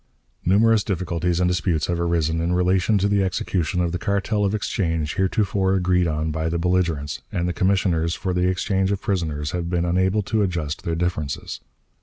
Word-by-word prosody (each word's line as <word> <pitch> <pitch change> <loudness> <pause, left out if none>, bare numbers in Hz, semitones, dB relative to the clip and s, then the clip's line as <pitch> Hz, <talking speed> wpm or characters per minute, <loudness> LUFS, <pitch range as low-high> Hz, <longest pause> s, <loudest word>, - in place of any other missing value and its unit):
"Numerous 105 +3 +4
difficulties 90 -2 -1
and 90 - +2
disputes 90 -3 0
have 85 -1 -2
arisen 85 -1 0
in 85 +1 0
relation 90 +3 +2
to 100 +1 +2
the 100 -1 +2
execution 90 -1 -1
of 85 -1 0
the 90 - -3
cartel 100 +1 0
of 100 +1 +1
exchange 80 -6 -1
heretofore 95 0 +1
agreed 90 -1 +2
on 80 0 -1
by 80 +1 -2
the 85 - -1
belligerents, 85 -4 0
and 85 0 -1
the 90 - -1
commissioners 90 -4 +1
for 95 - -3
the 90 0 +1
exchange 95 +1 0
of 100 - 0
prisoners 80 -7 -2
have 85 -1 -3
been 85 -1 0
unable 95 +4 +1
to 110 +2 0
adjust 85 -6 -2
their 85 - -1
differences. 80 -5 -3
90 Hz, 185 wpm, -23 LUFS, 85-95 Hz, -, Numerous